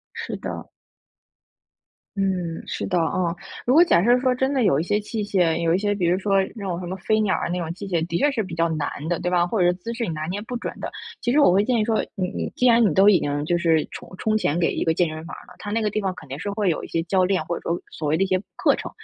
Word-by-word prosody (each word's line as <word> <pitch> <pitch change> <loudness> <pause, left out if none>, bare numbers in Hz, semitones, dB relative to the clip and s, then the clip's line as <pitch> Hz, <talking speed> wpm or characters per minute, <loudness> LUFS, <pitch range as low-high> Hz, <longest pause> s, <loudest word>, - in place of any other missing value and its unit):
是 - - -5
的。 - - -6 1.5
嗯， 180 -4 -1
是 - - -4
的 180 - 0
啊。 170 +1 0 0.3
如 250 - +3
果 325 +4 +8
假 335 - +4
设 240 +3 +5
说 260 -1 +3
真 265 +2 0
的 265 -3 +2
有 140 -9 +3
一 - - 0
些 205 +4 0
器 215 +1 -4
械， 180 -5 +1
有 165 0 +2
一 - - +3
些， 205 +1 0
比 185 -4 0
如 175 +2 +3
说 195 +1 0 0.2
那 215 - -7
种 175 -3 -2
什 180 - -6
么 185 - -4
飞 215 +3 0
鸟 210 -3 +2
啊 - - -2
那 180 +1 -1
种 165 -2 -4
器 195 +3 -8
械 170 -3 0
的 170 - -1
确 290 +10 +3
是 250 -5 -1
比 185 -5 -6
较 165 0 +1
难 155 -2 -1 0.2
的， 175 - 0
对 180 - -1
吧？ 175 -1 +3
或 205 +4 -2
者 180 - +4
是 175 - +3
姿 185 +6 -6
势 235 0 -2
你 - - -4
拿 155 0 -4
捏 195 +4 -3
不 245 +3 -6
准 240 - -4
的。 - - -4 0.3
其 240 - -2
实 290 - +4
我 285 - +6
会 190 +3 +4
建 250 0 +2
议 220 - +2
说， 220 0 +1
你 185 -3 -1
你 - - -4
既 250 - +3
然 235 -1 +6
你 - - -1
都 195 +4 +6
已 195 - +5
经 145 0 -2
就 175 +3 +1
是 165 -2 +2
充 - - -9
充 215 +2 +1
钱 160 -7 0
给 175 - +1
一 - - -2
个 165 - +3
健 170 0 +1
身 155 +1 -7
房 - - -8
儿 - - -12
了， - - -16
他 205 - -6
那 225 +2 0
个 215 - +1
地 210 - -2
方 195 -3 -1
肯 155 - -13
定 135 +2 -6
是 205 - -4
会 200 -2 0
有 165 - -1
一 - - -9
些 165 - -1
教 185 +2 +2
练， 185 -3 +1
或 170 +2 -3
者 - - -9
说， 170 - +1
所 155 - -4
谓 150 - +2
的 180 - +2
一 - - +2
些， 185 -1 +1
课 - - +3
程， - - -6
185 Hz, 335 characters per minute, -23 LUFS, 170-215 Hz, 1.5 s, 果